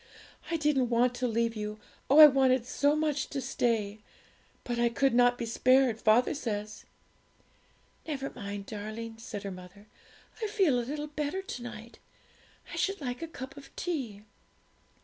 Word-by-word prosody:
I 330 - 0
didn't 295 -5 +1
want 245 +1 +3
to 250 - 0
leave 230 0 0
you 210 0 -5 0.3
oh, 280 - +5
I 310 - +13
wanted 265 -3 +4
so 285 +3 +2
much 300 -2 0
to 280 - -4
stay! 220 -5 -1 0.6
but 240 -1 -3
I 235 0 +3
could 270 +3 +1
not 245 0 +4
be 235 - -3
spared, 250 0 +3
father 225 +3 +4
says.' 210 -6 -4 1.2
'Never 275 -3 -3
mind, 200 -3 -6
darling,' 220 +2 -7
said 215 -3 -7
her 200 - -4
mother. 185 +2 -12 0.6
'I - - +1
feel 385 - +2
a - - 0
little 295 +5 -4
better 300 +5 -3
to 250 - -6
night. 235 -1 -9 0.7
I - - -5
should 390 0 0
like 250 -2 -4
a 330 - -4
cup 270 -4 -9
of 280 - -11
tea.' 255 - -4
245 Hz, 165 wpm, -30 LUFS, 220-285 Hz, 1.2 s, I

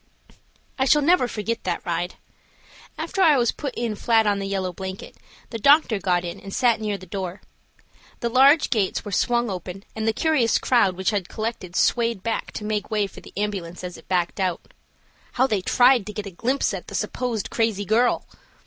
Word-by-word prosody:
I 265 - +3
shall 295 +2 +4
never 335 -4 +4
forget 225 0 -3
that 175 -2 -3
ride. 175 +1 -2 0.8
After 390 - -2
I 315 -6 +6
was 240 -2 +2
put 280 -4 -6
in 235 -2 -2
flat 225 +1 +2
on 205 -1 +1
the 195 - -3
yellow 190 -2 -2
blanket, 190 +1 -7 0.4
the 230 - -4
doctor 280 -4 +5
got 180 -2 0
in 175 +3 -6
and 195 - -10
sat 235 0 +2
near 210 -2 -2
the 185 - -12
door. 185 0 -5 0.8
The 235 - 0
large 275 +6 +5
gates 210 -5 0
were 205 - -6
swung 240 +2 +1
open, 185 +1 -6
and 220 0 -2
the - - +4
curious 270 -2 +2
crowd 230 -7 +2
which 190 +2 0
had 200 -4 -2
collected 215 -5 -5
swayed 230 -5 +1
back 230 - -2
to 210 - -6
make 210 -1 -2
way 210 -2 +1
for 195 - -11
the - - -14
ambulance 190 -4 -3
as 180 -1 -6
it - - -15
backed 180 0 0
out. 185 -3 -2 0.6
How 255 - +3
they 210 -7 0
tried 245 +1 +4
to 210 - -6
get 210 -1 -5
a 200 - -7
glimpse 250 +10 0
at - - -6
the - - -7
supposed 235 -5 -2
crazy 220 -3 0
girl! 235 +4 +2
215 Hz, 200 wpm, -23 LUFS, 190-240 Hz, 0.8 s, I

